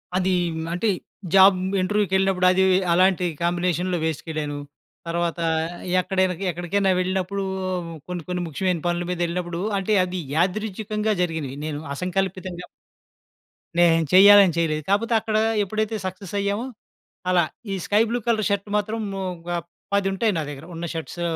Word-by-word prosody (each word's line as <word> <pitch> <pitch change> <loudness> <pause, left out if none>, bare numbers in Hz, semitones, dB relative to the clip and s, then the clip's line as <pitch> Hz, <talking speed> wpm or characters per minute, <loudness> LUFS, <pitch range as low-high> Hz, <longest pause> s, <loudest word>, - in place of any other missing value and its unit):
అది 185 0 +1 0.4
అంటే, 180 +6 -1 0.5
జాబ్ 190 0 +8 0.2
ఇంటర్‌వ్యూకెళ్ళినప్పుడు 190 -1 +2
అది 190 +1 +3 0.3
అలాంటి 185 0 +3 0.2
కాంబినేషన్‌లో 175 +1 0
వేసుకెళ్ళను. 155 -2 -3 0.5
తర్వాత 170 0 -1 0.6
ఎక్కడైనా 185 0 +1 0.2
ఎక్కడికైనా 175 +3 0
వెళ్ళినప్పుడు 185 +1 -1 0.6
కొన్ని 180 -2 -5
కొన్ని 180 0 -1
ముఖ్యమైన 175 +3 -1
పనుల 175 0 0
మీద 180 - -3
యెళ్ళినప్పుడు 175 0 -3 0.2
అంటే, 195 +3 0
అది 185 0 -3 0.2
యాదృచ్చికంగా 210 +4 0
జరిగినవి. 160 -6 -3
నేను 150 -2 -3 0.2
అసంకల్పితంగా 185 0 -3 1.1
నేను 165 -1 +5
చెయ్యాలని 200 -1 +8
చేయలేదు. 155 -2 0
కాపోతే 230 +4 +2
అక్కడ 215 0 -1 0.3
ఎప్పుడైతే 215 +2 -2
సక్సెస్ 185 0 -6
అయ్యామో 200 +4 -1 0.6
అలా. 180 -1 +4 0.3
ఈ - - -1
స్కై 210 +1 +3
బ్లూ 240 +1 0
కలర్ 220 -3 +2
షర్ట్ 200 0 -1
మాత్రం 215 +2 -2 0.3
ఒక 170 0 -11 0.4
10 200 -1 +2
ఉంటాయి 215 +2 +1
నా - - -1
దగ్గర. 145 +2 -9
ఉన్న 170 +1 -4
షర్ట్స్ 165 +2 -5
185 Hz, 130 wpm, -23 LUFS, 175-200 Hz, 1.1 s, జాబ్